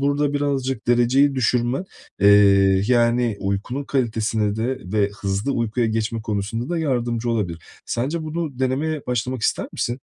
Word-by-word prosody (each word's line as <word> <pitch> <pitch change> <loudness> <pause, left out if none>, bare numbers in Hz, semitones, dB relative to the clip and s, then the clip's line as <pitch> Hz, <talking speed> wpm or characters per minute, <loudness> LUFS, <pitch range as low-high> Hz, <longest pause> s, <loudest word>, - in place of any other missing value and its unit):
burada 145 +1 +1
birazcık 135 -5 -1
dereceyi 125 +4 +3
düşürme, 125 +4 0 0.4
eee, 100 -1 +5
yani, 120 -2 +2
uykunun 100 +8 -2
kalitesine 110 -5 0
de 125 +4 -1
ve 105 -2 +2
hızlı 100 +6 -1
uykuya 115 -1 0
geçme 110 0 -2
konusunda 110 +2 -3
da 175 - -1
yardımcı 120 -6 -1
olabilir. 90 -8 -2 0.2
Sence 145 +8 -2
bunu 155 -3 -4
denemeye 140 +4 -1
başlamak 125 0 -2
ister - - 0
misin? 120 +2 -3
120 Hz, 135 wpm, -22 LUFS, 110-135 Hz, 0.4 s, eee